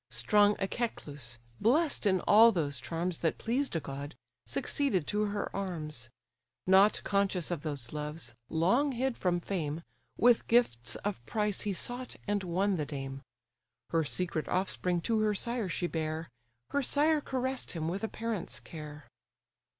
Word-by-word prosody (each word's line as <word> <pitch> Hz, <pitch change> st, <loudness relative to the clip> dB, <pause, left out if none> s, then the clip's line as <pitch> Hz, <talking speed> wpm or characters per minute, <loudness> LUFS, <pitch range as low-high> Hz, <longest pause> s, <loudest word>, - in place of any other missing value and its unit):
Strong 205 Hz, -, +4 dB
Echecleus, 145 Hz, -, -3 dB, 0.2 s
bless'd 280 Hz, +1 st, +3 dB
in 190 Hz, -2 st, +3 dB
all 225 Hz, +3 st, +7 dB
those 145 Hz, -, -1 dB
charms 165 Hz, +6 st, -2 dB
That 165 Hz, -, 0 dB
pleased 255 Hz, 0 st, -1 dB
a -, -, +2 dB
god, 140 Hz, 0 st, -6 dB, 0.3 s
succeeded 225 Hz, -, 0 dB
to 210 Hz, +4 st, +1 dB
her 205 Hz, 0 st, -3 dB
arms; 155 Hz, -10 st, -3 dB, 0.6 s
Not 195 Hz, +3 st, +5 dB
conscious 195 Hz, -4 st, +1 dB
of 170 Hz, -4 st, -2 dB
those 145 Hz, -6 st, -5 dB
loves, 150 Hz, 0 st, -4 dB, 0.2 s
long 235 Hz, -, +2 dB
hid 255 Hz, +1 st, 0 dB
from 175 Hz, -1 st, +1 dB
fame, 165 Hz, -4 st, -3 dB, 0.3 s
With 240 Hz, -1 st, +5 dB
gifts 175 Hz, -, +2 dB
of 205 Hz, -, -2 dB
price 210 Hz, -2 st, 0 dB
he 205 Hz, -, -1 dB
sought 245 Hz, +6 st, -2 dB
and 205 Hz, -1 st, 0 dB
won 185 Hz, +2 st, +1 dB
the 150 Hz, -, -1 dB
dame; 135 Hz, -2 st, -5 dB, 0.7 s
Her 165 Hz, -1 st, +3 dB
secret 165 Hz, +1 st, -2 dB
offspring 180 Hz, -1 st, 0 dB
to 225 Hz, +4 st, +1 dB
her 215 Hz, -1 st, +2 dB
sire 235 Hz, -1 st, 0 dB
she 175 Hz, -, -1 dB
bare; 160 Hz, -1 st, -2 dB, 0.4 s
Her 285 Hz, -, +2 dB
sire 300 Hz, +3 st, +3 dB
caress'd 260 Hz, -1 st, -2 dB
him 160 Hz, -2 st, -2 dB
with 190 Hz, +6 st, -2 dB
a -, -, +1 dB
parent's 220 Hz, -5 st, -4 dB
care. 150 Hz, -2 st, -9 dB
185 Hz, 150 wpm, -31 LUFS, 155-220 Hz, 0.7 s, all